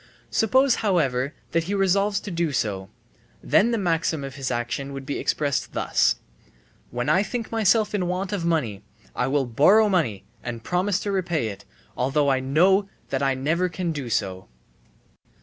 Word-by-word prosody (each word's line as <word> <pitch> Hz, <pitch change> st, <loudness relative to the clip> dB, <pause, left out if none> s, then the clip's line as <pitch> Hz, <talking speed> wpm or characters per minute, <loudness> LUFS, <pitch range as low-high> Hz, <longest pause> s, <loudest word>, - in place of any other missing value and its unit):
Suppose 260 Hz, +3 st, +3 dB
however 140 Hz, -, +1 dB, 0.2 s
that 165 Hz, 0 st, +1 dB
he 200 Hz, +3 st, -2 dB
resolves 195 Hz, +1 st, +2 dB
to 205 Hz, -, -7 dB
do 170 Hz, -2 st, 0 dB
so: 100 Hz, -7 st, -2 dB, 0.5 s
then 225 Hz, -, +4 dB
the 235 Hz, -, 0 dB
maxim 165 Hz, -5 st, 0 dB
of 135 Hz, -1 st, -6 dB
his 135 Hz, -1 st, -4 dB
action 125 Hz, +3 st, -3 dB
would 135 Hz, -1 st, -7 dB
be 140 Hz, -, -3 dB
expressed 145 Hz, -3 st, -1 dB
thus: -, -, +2 dB, 0.7 s
"When 120 Hz, 0 st, -3 dB
I 190 Hz, -, +4 dB
think 225 Hz, +3 st, -4 dB
myself 220 Hz, -1 st, +2 dB
in 185 Hz, -4 st, 0 dB
want 185 Hz, +2 st, -2 dB
of 195 Hz, -4 st, -2 dB
money, 145 Hz, -13 st, 0 dB, 0.3 s
I 125 Hz, -, 0 dB
will 135 Hz, 0 st, +1 dB
borrow 185 Hz, -, +5 dB
money 125 Hz, -, 0 dB, 0.2 s
and 115 Hz, -2 st, -6 dB
promise 185 Hz, +4 st, 0 dB
to 205 Hz, -, -2 dB
repay 170 Hz, -, -1 dB
it, 100 Hz, 0 st, -9 dB, 0.3 s
although 140 Hz, +2 st, +1 dB
I 130 Hz, -, +2 dB
know 185 Hz, +9 st, +3 dB, 0.2 s
that 135 Hz, -, 0 dB
I 135 Hz, -1 st, +2 dB
never 165 Hz, +7 st, 0 dB
can 175 Hz, 0 st, -3 dB
do 140 Hz, -6 st, -5 dB
so." 95 Hz, -4 st, -2 dB
160 Hz, 170 wpm, -24 LUFS, 130-195 Hz, 0.7 s, borrow